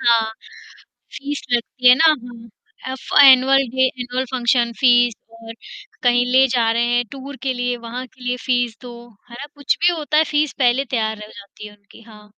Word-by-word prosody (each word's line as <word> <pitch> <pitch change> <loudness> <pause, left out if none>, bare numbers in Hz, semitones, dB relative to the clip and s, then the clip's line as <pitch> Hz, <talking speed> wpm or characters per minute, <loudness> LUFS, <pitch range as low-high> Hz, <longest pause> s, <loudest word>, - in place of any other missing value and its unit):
हाँ। 230 -2 +2 0.8
फ़ीस 285 0 -6
लगती 250 +1 +1
है 250 - +8
ना, 270 - +1
हाँ। 245 -7 -1 0.4
Of 260 - -10 0.2
annual 270 0 +5
day, 260 +1 +1
annual 250 +1 -3
function 240 -2 0
fees 245 -2 +4 0.3
और 225 0 -10 0.5
कहीं 245 0 +2
ले 265 +1 +5
जा 230 -2 +1
रहे 235 +1 0
हैं, 245 - 0
टूर 275 +1 -9
के 270 -2 -1
लिए, 245 0 -2
वहाँ 240 +2 -8
के 255 +1 -21
लिए 250 0 -2
फ़ीस 245 -3 -1
दो, 245 -1 -10 0.4
है 235 - -12
ना? 285 - -7
कुछ 285 -2 -1
भी 350 +1 +3
होता 305 -2 -3
है, 310 - +4
फ़ीस 300 -2 -1
पहले 255 +1 +1
तैयार 220 -4 -3
रह 210 0 -11
जाती 200 +1 -13
है 210 0 -14
उनकी। 205 +2 -20
हाँ। 210 -1 -17
245 Hz, 195 wpm, -19 LUFS, 235-265 Hz, 0.8 s, है